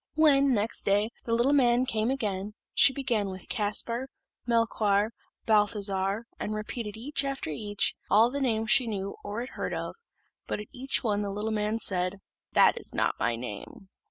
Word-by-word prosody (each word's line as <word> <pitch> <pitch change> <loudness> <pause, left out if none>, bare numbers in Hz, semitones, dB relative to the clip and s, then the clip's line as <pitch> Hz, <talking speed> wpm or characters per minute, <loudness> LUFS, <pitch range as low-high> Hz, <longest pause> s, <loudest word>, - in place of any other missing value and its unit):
When, 280 -4 +5
next 210 +2 0
day, 205 +3 +1
the 230 - +1
little 245 +5 +3
man 250 -2 +4
came 225 -3 0
again, 210 -6 -2 0.2
she - - +7
began 245 -7 -1
with 185 -1 -8
Caspar, 230 +4 -1 0.4
Melchoir, 220 -3 +2 0.3
Balthazar, 205 -1 +1
and 215 - -3
repeated, 215 0 -5
each 275 +4 -1
after 275 - -3
each, 205 +6 -1 0.2
all 225 +3 +5
the 280 +1 -3
names 225 -4 +1
she 255 0 +4
knew 200 -2 -3
or 205 +3 -4
had 250 - -6
heard - - -4
of; - - -4 0.5
but - - -2
at 210 - -8
each 265 0 -1
one 210 -3 +1
the 205 - -2
little 210 +2 -3
man 215 +1 0
said, 185 -3 +1 0.4
"That - - +5
is - - -2
not - - +2
my 115 - +1
name." 120 - -8
215 Hz, 175 wpm, -28 LUFS, 205-245 Hz, 0.5 s, she